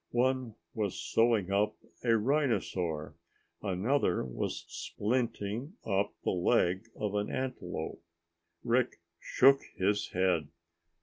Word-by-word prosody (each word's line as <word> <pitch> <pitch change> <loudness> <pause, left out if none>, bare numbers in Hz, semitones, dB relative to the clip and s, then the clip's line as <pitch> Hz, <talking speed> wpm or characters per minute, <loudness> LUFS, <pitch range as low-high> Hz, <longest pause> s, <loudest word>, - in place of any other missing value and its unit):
One 125 -1 +1 0.2
was 105 -4 -2
sewing 115 -5 +2
up 100 +2 +2 0.3
a 115 -2 +4
rhinosaur. 105 - 0 0.5
Another 100 - +1
was 60 - -3
splinting 115 - -2
up 100 -1 +1
the - - +1
leg 90 +3 +2
of 105 -2 -2
an 105 0 0
antelope. 90 -13 -4 0.6
Rick 125 -2 +1 0.2
shook 135 +1 +5 0.2
his 100 +2 +1
head. 90 -5 +1
105 Hz, 105 wpm, -31 LUFS, 95-125 Hz, 0.6 s, shook